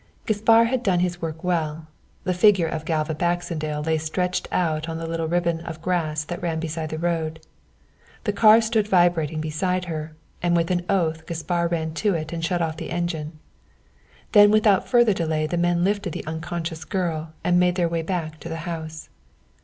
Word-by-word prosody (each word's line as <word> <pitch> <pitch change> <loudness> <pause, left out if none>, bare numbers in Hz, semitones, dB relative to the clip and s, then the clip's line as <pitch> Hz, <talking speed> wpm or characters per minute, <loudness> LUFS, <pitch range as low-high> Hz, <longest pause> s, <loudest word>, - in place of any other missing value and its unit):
Gaspar 225 +2 +4
had 240 +2 0
done 185 -6 +2
his 180 0 -1
work 165 +1 -5
well. 160 -3 -1 0.4
The 185 - 0
figure 185 -1 +5
of 160 -1 -4
Galva 160 -1 0
Baxendale 155 -2 -2
lay 160 0 +1
stretched 180 +4 -2
out 160 -2 0
on 160 - -3
the 165 - -5
little 165 0 -2
ribbon 170 0 0
of 165 -1 -7
grass 160 -3 -1
that 175 +3 -6
ran 165 -2 -1
beside 160 -1 -4
the 155 - -4
road. 160 -1 -1 0.8
The 210 -2 0
car 220 +1 +7
stood 220 -2 +1
vibrating 175 -5 +2
beside 180 +4 -1
her, 155 -2 -5 0.3
and 175 0 +2
with 170 +1 +1
an 175 0 -1
oath 160 -4 0
Gaspar 170 +1 -1
ran 160 -2 -2
to 205 -4 +2
it 155 0 -4
and 165 -1 -4
shut 175 +1 0
off 160 -1 -3
the - - -6
engine. 170 -3 -3 0.9
Then 205 -1 +8
without 210 -2 +4
further 240 -4 +4
delay 160 -3 -1
the 155 - -2
men 175 0 +2
lifted 195 -3 0
the - - -5
unconscious 160 +1 -4
girl 160 -3 -3
and 175 0 +3
made 180 0 +3
their 175 -2 +2
way 165 0 -1
back 160 -2 -3
to 170 - -8
the 165 - -4
house. 160 -2 -6
170 Hz, 190 wpm, -24 LUFS, 160-180 Hz, 0.9 s, Then